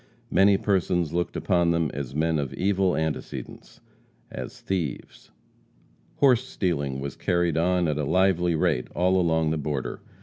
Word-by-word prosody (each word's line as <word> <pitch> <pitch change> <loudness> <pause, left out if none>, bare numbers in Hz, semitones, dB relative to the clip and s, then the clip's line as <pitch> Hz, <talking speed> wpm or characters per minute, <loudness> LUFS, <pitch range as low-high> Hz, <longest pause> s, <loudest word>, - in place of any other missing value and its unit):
Many 100 0 +5
persons 90 -5 0
looked 85 0 -1
upon 85 -3 +2
them 85 -4 +1
as 70 -1 -5
men 80 0 +1
of 70 -3 -4
evil 95 -1 +1
antecedents 80 -1 -5 0.5
as - - -7
thieves. 85 -10 -4 0.9
Horse 130 -3 +4
stealing 70 - -2
was 70 0 -5
carried 85 -2 0
on 90 +1 +2
at 75 -1 -1
a - - 0
lively 90 +1 +2
rate 65 -5 0
all 90 +1 +3
along 80 -2 +1
the 80 - -1
border. 70 -2 -3
85 Hz, 145 wpm, -25 LUFS, 75-90 Hz, 0.9 s, Many